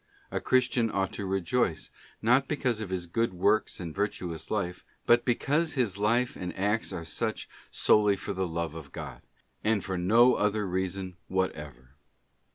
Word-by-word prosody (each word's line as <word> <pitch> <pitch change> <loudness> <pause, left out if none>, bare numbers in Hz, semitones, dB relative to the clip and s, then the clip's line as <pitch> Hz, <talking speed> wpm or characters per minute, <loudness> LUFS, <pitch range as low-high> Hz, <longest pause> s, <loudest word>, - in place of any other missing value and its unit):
A - - -2
Christian 125 -2 +2
ought 95 -2 -1
to 100 - -4
rejoice, 95 0 0 0.3
not 125 +4 +4
because 125 -6 0
of 105 - -5
his 90 -2 -2
good 105 +3 -1
works 105 +4 +2
and 85 -4 -5
virtuous 90 -5 -3
life, 90 -4 -2 0.2
but 120 0 +4
because 150 +6 +1
his 115 -8 0
life 120 +5 +2
and 90 -1 -6
acts 105 +4 0
are 85 - -5
such 75 - -3 0.2
solely 105 -1 +4
for 100 - -5
the 95 -1 -1
love 85 -1 -3
of 80 -3 -9
God, - - -7 0.4
and 110 -2 +1
for 95 -2 -2
no 115 +8 +5
other 105 -1 +1
reason 95 0 -3
whatever. 75 -9 -3
100 Hz, 165 wpm, -29 LUFS, 90-115 Hz, 0.4 s, no